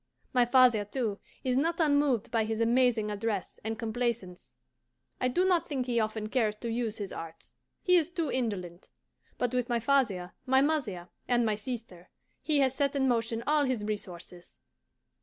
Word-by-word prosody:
My 250 -1 +4
father, 245 -4 +5
too, 210 -1 -3 0.2
is 255 -1 +1
not 330 +6 +1
unmoved 285 -8 +2
by 225 -2 +2
his 220 0 -2
amazing 230 -2 +2
address 205 -2 -3
and 220 +1 -3
complaisance. 230 -5 -3 0.6
I 250 - +1
do 350 +9 +1
not 360 -3 +2
think 265 -4 -1
he 240 -2 +1
often 215 -1 -2
cares 220 -3 +1
to 230 +2 -5
use 225 -2 -2
his 200 -2 -5
arts 165 0 -9 0.3
he 360 -3 +5
is 330 -1 +1
too 335 -4 -2
indolent; 190 -8 -3 0.5
but 245 0 -1
with 250 -1 0
my 240 -1 +1
father, 220 -9 +1
my 265 +1 +5
mother, 250 - 0 0.2
and 240 -1 +2
my 215 - +2
sister 215 -5 -7 0.3
he 300 -3 +2
has 260 -1 +3
set 280 +1 0
in 265 -1 +2
motion 230 -1 0
all 300 -1 +3
his 255 -5 -1
resources. 180 -4 -7
235 Hz, 175 wpm, -30 LUFS, 210-265 Hz, 0.6 s, father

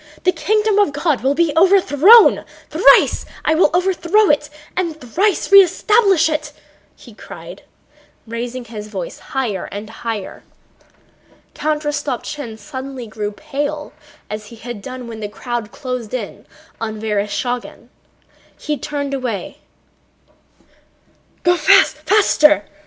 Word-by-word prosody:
The 365 - +4
kingdom 420 +5 +1
of 400 -9 +2
God 290 -2 0
will 270 +3 +1
be 335 -2 +1
overthrown... 375 - +6 0.3
Thrice - - +5 0.2
will 315 +1 +4
I 345 - +2
overthrow 375 +2 +2
it 295 0 -1 0.3
and 335 -4 -2
thrice 380 - -1
re 395 - +10
establish 390 -1 +3
it!" 305 -1 -3 0.4
he - - -16
cried, - - -11 0.6
raising 240 +2 -5
his 215 -2 -8
voice 190 -5 -6
higher 240 -8 -3
and 210 +2 -8
higher. 225 -3 -6 1.1
Count 305 0 -2
Rostopchín 290 -4 -4
suddenly 265 -1 -8
grew 210 -1 -5
pale 290 +7 -5 0.3
as 210 0 -7
he 235 - -12
had 230 -1 -8
done 255 +2 -8
when 225 -1 -8
the 210 -1 -5
crowd 235 0 -5
closed 250 -4 -5
in 250 - -7 0.3
on 220 -1 -4
Vereshchágin. 220 +3 -3 0.7
He 300 -1 -4
turned 285 -2 -4
away. 245 -8 -4
275 Hz, 115 wpm, -18 LUFS, 225-320 Hz, 1.1 s, re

